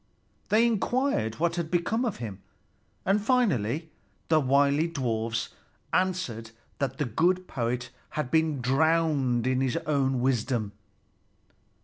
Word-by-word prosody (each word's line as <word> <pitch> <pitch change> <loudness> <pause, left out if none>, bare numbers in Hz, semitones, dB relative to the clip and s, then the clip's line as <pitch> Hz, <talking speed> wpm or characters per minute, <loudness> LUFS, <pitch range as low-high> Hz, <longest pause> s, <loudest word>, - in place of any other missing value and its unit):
They 220 +3 +5
inquired 235 - 0
what 170 +1 0
had 170 -2 -2
become 200 +8 0
of 225 - -2
him, 105 -5 -7 0.6
and 195 +2 +2
finally 165 - +1 0.4
the 160 -1 +5
wily 140 +3 +3
dwarfs 115 -7 -2 0.4
answered 180 -12 -1 0.3
that 135 -2 -2
the 145 - 0
good 175 - +1
poet 125 0 -2 0.3
had 145 -5 -2
been 160 -4 +2
drowned 140 -2 +2
in 130 0 +1
his 130 -2 0
own 135 -3 +1
wisdom. 120 -4 0
140 Hz, 120 wpm, -27 LUFS, 125-170 Hz, 0.6 s, They